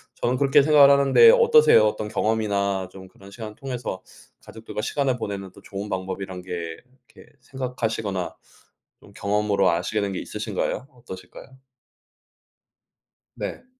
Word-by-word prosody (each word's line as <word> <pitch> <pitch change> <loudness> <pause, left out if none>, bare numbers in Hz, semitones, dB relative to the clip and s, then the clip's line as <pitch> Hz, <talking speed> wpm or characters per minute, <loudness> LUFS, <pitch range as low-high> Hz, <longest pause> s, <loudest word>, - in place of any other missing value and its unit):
저는 125 +1 -1
그렇게 140 0 +4
생각을 145 -1 +6
하는데 140 - +6
어떠세요? 465 - +6
어떤 105 0 -3
경험이나 100 -4 -1
좀 95 0 -12
그런 100 0 -16
시간 110 0 -8
통해서 125 -7 -6 0.4
가족들과 110 -1 -9
시간을 135 +1 -1
보내는 100 -4 -6
또 - - -16
좋은 100 +1 -7
방법이라는 95 0 -5
게 85 -3 -6 0.4
이렇게 - - -16
생각하시거나 110 -7 -4 0.7
좀 - - -17
경험으로 100 -1 +1
아시게 105 +5 -1
된 100 -1 -2
게 - - -4
있으신가요? 130 - -4
어떠실까요? 95 -7 -11 1.9
네. - - -6
105 Hz, 340 characters per minute, -23 LUFS, 95-130 Hz, 1.9 s, 생각을